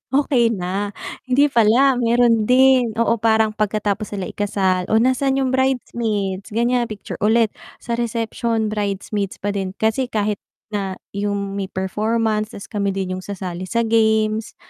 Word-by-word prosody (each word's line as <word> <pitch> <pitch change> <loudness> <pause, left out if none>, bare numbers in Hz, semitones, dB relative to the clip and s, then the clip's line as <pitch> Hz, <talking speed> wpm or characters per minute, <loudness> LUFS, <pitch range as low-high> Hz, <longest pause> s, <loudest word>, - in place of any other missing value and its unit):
okey 250 -5 +3
na, 195 +1 -2 0.4
hindi 280 +3 +4
pala, 245 +2 +4
meron 235 -1 +3
din, 255 -2 +5
oo, 230 0 +3
parang 220 -1 +2
pagkatapos 210 0 -1
sila 190 -2 -4
ikasal 190 -3 0
o 220 - +5
nasaan 265 +2 +2
'yong 260 -1 0
bridesmaid 225 -7 -1
ganyan 240 +2 +1
picture 215 -3 -7
ulit, 225 +1 +4 0.3
sa 235 -1 -3
reception 230 -1 -1
bridesmaids 200 -1 -3
pa 205 - -2
din. 190 -1 -2
Kasi 235 +4 0
kahit 210 -1 -1 0.3
na 195 -2 -3 0.2
yung 200 -1 -2
may 195 -1 -4
performance 215 +3 -1
tas 200 - -9
kami 200 -2 -1
din 190 -1 -3
yung - - -11
sasali 185 -3 -5
sa 235 +3 0
games, 220 0 +1
220 Hz, 145 wpm, -20 LUFS, 200-235 Hz, 0.4 s, din